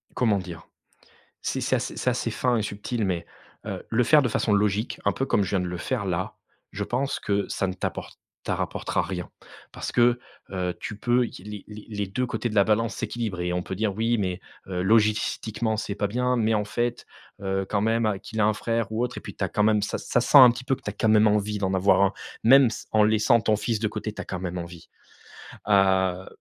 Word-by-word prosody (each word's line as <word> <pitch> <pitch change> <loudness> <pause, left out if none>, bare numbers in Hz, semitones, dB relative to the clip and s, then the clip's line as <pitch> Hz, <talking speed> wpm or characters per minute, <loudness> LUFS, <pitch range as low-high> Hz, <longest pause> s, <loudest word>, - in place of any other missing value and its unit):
Comment 110 -5 +2
dire? 85 -3 -9 0.8
C'est - - -2
c'est - - +1
ass - - -3
c'est - - +1
assez - - -2
fin 125 -1 +1
et 110 - 0
subtil 105 +3 -3
mais 85 -3 -2 0.4
heu, - - -5
le 120 +2 +2
faire 150 +4 +6
de 125 - +1
façon 110 -1 0
logique 105 +2 +1
un 100 - +3
peu 135 - -2
comme 105 - +2
je 95 - -2
viens 100 - +1
de 90 - -2
le 90 - -4
faire 120 +3 -2
là. 90 0 -2 0.4
Je - - -3
pense 135 +4 -2
que 100 0 0
ça 95 - -1
ne 95 - -2
t'apporte 90 - -5 0.3
ta - - -1
rapportera - - -2
rien, 90 -3 -5 0.4
parce - - -5
que, 120 0 +3 0.3
heu, 90 -2 -2
tu 105 - -6
peux 120 +2 +2
i 90 - -11
les 105 0 -8
les 105 0 -11
les 105 -2 -3
2 125 +7 -2
côtés 120 -1 -2
de 105 - -6
la 100 - +6
balance 110 +2 +1
s'équilibrent 110 -7 -3
et 90 0 -1
on 90 0 -1
peut 95 - -5
dire: 105 +1 0
«Oui 115 +1 +1
mais 95 -3 -2 0.3
heu, 90 -1 -2
logistiquement 110 +1 +1
c'est 105 -2 -4
pas 105 - 0
bien 125 +4 0
mais, 110 -1 +2
en 105 -1 +1
fait, 120 +3 -2 0.4
heu, 95 0 -1
quand 100 - 0
même, 110 -2 +1
qu'il 110 - -4
a - - +4
un 110 - +3
frère 115 0 -2
ou 110 +2 0
autre», 125 - -3
et - - -7
puis - - -9
tu - - -7
as - - -1
quand 105 - +1
même, 105 -1 +3
ça 105 - -2
ça 125 - 0
sent 140 - +6
un 130 -2 +11
petit 125 - -7
peu 135 0 +1
que - - -21
tu - - -3
as - - -7
quand 110 +2 0
même 110 0 +5
envie 105 0 +1
d'en 95 -1 -1
avoir 95 +1 +4
un. 100 0 +3 0.3
Même 130 +1 +7
ce, - - -7
en 110 - +5
laissant 110 +2 +4
ton 105 0 +2
fils 110 0 -2
de 110 - +1
côté, 110 0 -5
tu - - -8
as - - -4
quand 95 - -5
même 90 -1 -4
envie. 85 -1 -9 0.8
Heu, 95 -2 +3
105 Hz, 245 wpm, -25 LUFS, 95-115 Hz, 0.8 s, un